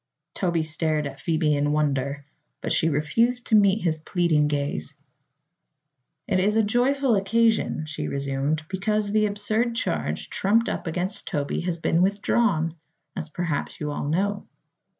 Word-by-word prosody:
Toby 170 Hz, -4 st, 0 dB
stared 155 Hz, -1 st, -1 dB
at 140 Hz, 0 st, -6 dB
Phoebe 155 Hz, -2 st, +1 dB
in 145 Hz, +1 st, +1 dB
wonder, 140 Hz, -2 st, 0 dB, 0.3 s
but -, -, -2 dB
she 165 Hz, -, +2 dB
refused 230 Hz, -, +1 dB
to 220 Hz, -, +3 dB
meet 200 Hz, 0 st, +4 dB
his 160 Hz, -3 st, +1 dB
pleading 160 Hz, -2 st, +1 dB
gaze. 140 Hz, -, -2 dB, 1.3 s
"It 185 Hz, -2 st, +2 dB
is 210 Hz, +4 st, +2 dB
a 225 Hz, -, +4 dB
joyful 250 Hz, +4 st, +2 dB
occasion," 220 Hz, -4 st, +2 dB
she 150 Hz, -1 st, -4 dB
resumed, 140 Hz, +3 st, -1 dB
"because 205 Hz, +2 st, -1 dB
the 215 Hz, 0 st, +3 dB
absurd 215 Hz, +3 st, 0 dB
charge 230 Hz, -, -2 dB
trumped 225 Hz, +4 st, +2 dB
up -, -, -4 dB
against 180 Hz, +4 st, -3 dB
Toby 145 Hz, -1 st, -2 dB
has 170 Hz, -2 st, -1 dB
been 165 Hz, +1 st, +1 dB
withdrawn, 195 Hz, -3 st, +1 dB, 0.4 s
as 165 Hz, -4 st, -5 dB
perhaps 165 Hz, -3 st, -3 dB
you 150 Hz, 0 st, -3 dB
all 145 Hz, 0 st, -3 dB
know." 200 Hz, +5 st, -1 dB
175 Hz, 150 wpm, -25 LUFS, 150-210 Hz, 1.3 s, meet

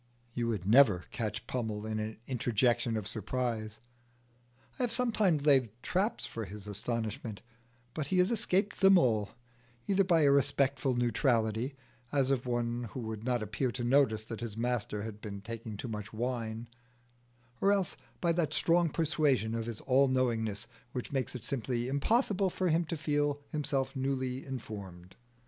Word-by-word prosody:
You 120 Hz, -1 st, -1 dB
would 105 Hz, -6 st, -2 dB
never 105 Hz, -5 st, +6 dB
catch 110 Hz, 0 st, -3 dB
Pummel 110 Hz, -4 st, -3 dB
in 110 Hz, 0 st, -2 dB
an 110 Hz, +1 st, -4 dB
interjection 120 Hz, -1 st, +1 dB
of 105 Hz, -2 st, -4 dB
surprise. 110 Hz, -1 st, -3 dB, 1.0 s
I -, -, -1 dB
have 245 Hz, -2 st, +1 dB
sometimes 215 Hz, -, +2 dB
laid 135 Hz, -5 st, +5 dB
traps 200 Hz, +5 st, 0 dB
for 115 Hz, -, -5 dB
his 100 Hz, +1 st, -8 dB
astonishment, 110 Hz, -1 st, -3 dB, 0.5 s
but 155 Hz, -3 st, -3 dB
he 185 Hz, -, 0 dB
has 180 Hz, +4 st, +4 dB
escaped 210 Hz, -3 st, +1 dB
them 195 Hz, 0 st, +7 dB
all, 110 Hz, -, +2 dB, 0.6 s
either 195 Hz, 0 st, +3 dB
by 170 Hz, -4 st, +3 dB
a 140 Hz, -2 st, +5 dB
respectful 140 Hz, -1 st, +2 dB
neutrality, 120 Hz, +1 st, +1 dB, 0.4 s
as 135 Hz, -2 st, +2 dB
of 125 Hz, -2 st, 0 dB
one 120 Hz, 0 st, -1 dB
who -, -, -3 dB
would 110 Hz, -1 st, -5 dB
not 120 Hz, -2 st, 0 dB
appear 115 Hz, +5 st, -1 dB
to 125 Hz, -, -4 dB
notice 120 Hz, -4 st, +3 dB
that 110 Hz, 0 st, -7 dB
his 115 Hz, -3 st, -5 dB
master 115 Hz, -3 st, -1 dB
had 105 Hz, -1 st, -7 dB
been 100 Hz, -2 st, -6 dB
taking 110 Hz, 0 st, -7 dB
too 125 Hz, -, -5 dB
much 105 Hz, -3 st, -5 dB
wine, 115 Hz, -1 st, -3 dB, 0.9 s
or 200 Hz, -, +5 dB
else 195 Hz, -3 st, +1 dB, 0.3 s
by 170 Hz, -, +3 dB
that 165 Hz, -2 st, 0 dB
strong 170 Hz, 0 st, +3 dB
persuasion 150 Hz, -8 st, +1 dB
of 115 Hz, 0 st, -2 dB
his 115 Hz, -2 st, -5 dB
all 135 Hz, +1 st, +4 dB
knowingness 115 Hz, -5 st, 0 dB, 0.3 s
which 125 Hz, -, -4 dB
makes 135 Hz, -2 st, -1 dB
it 125 Hz, -, -5 dB
simply 120 Hz, -2 st, -1 dB
impossible 195 Hz, -, +2 dB
for 185 Hz, 0 st, -1 dB
him 165 Hz, +2 st, +2 dB
to 165 Hz, +1 st, -3 dB
feel 145 Hz, -1 st, 0 dB
himself 135 Hz, -3 st, -1 dB
newly 130 Hz, -1 st, -1 dB
informed. 100 Hz, -8 st, -7 dB
125 Hz, 160 wpm, -31 LUFS, 110-145 Hz, 1.0 s, them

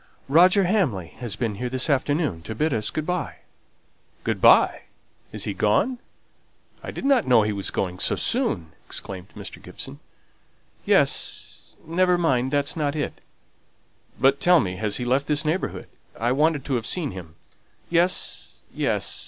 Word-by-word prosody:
"Roger 180 Hz, +7 st, +5 dB
Hamley 155 Hz, -, 0 dB
has 120 Hz, -5 st, -4 dB
been 115 Hz, -4 st, -2 dB
here 125 Hz, -, -2 dB
this 130 Hz, 0 st, +1 dB
afternoon 145 Hz, -, 0 dB
to 110 Hz, +6 st, -7 dB
bid 155 Hz, +5 st, 0 dB
us 110 Hz, -2 st, 0 dB
good 155 Hz, -, -3 dB
by." 180 Hz, +1 st, -2 dB, 0.9 s
"Good -, -, -2 dB
by! -, -, +5 dB, 0.5 s
Is -, -, -3 dB
he -, -, -2 dB
gone? 255 Hz, -1 st, +1 dB, 0.8 s
I -, -, -7 dB
didn't 270 Hz, -4 st, +1 dB
know 120 Hz, -4 st, +5 dB
he 105 Hz, -, 0 dB
was 100 Hz, -1 st, -2 dB
going 90 Hz, -1 st, -3 dB
so -, -, +1 dB
soon!" 80 Hz, -2 st, -1 dB
exclaimed 95 Hz, -2 st, -6 dB
Mr. -, -, -8 dB
Gibson. 70 Hz, -, -8 dB, 0.9 s
"Yes: -, -, 0 dB
never 180 Hz, +2 st, +2 dB
mind, 130 Hz, -7 st, +1 dB
that's 145 Hz, 0 st, 0 dB
not 150 Hz, -2 st, -1 dB
it." 150 Hz, -, -4 dB, 1.0 s
"But 135 Hz, +3 st, +4 dB
tell 175 Hz, +1 st, +5 dB
me; 95 Hz, -7 st, -2 dB
has 105 Hz, +1 st, 0 dB
he 125 Hz, -, -3 dB
left 130 Hz, +3 st, +1 dB
this 150 Hz, 0 st, +1 dB
neighbourhood? 160 Hz, +5 st, -2 dB, 0.3 s
I 120 Hz, +3 st, +1 dB
wanted 150 Hz, +1 st, +1 dB
to 140 Hz, -, -2 dB
have 115 Hz, -, -5 dB
seen 170 Hz, -5 st, 0 dB
him." 85 Hz, -4 st, -10 dB, 0.6 s
"Yes, 175 Hz, +2 st, +1 dB
yes. -, -, 0 dB
140 Hz, 155 wpm, -24 LUFS, 110-165 Hz, 1.0 s, Roger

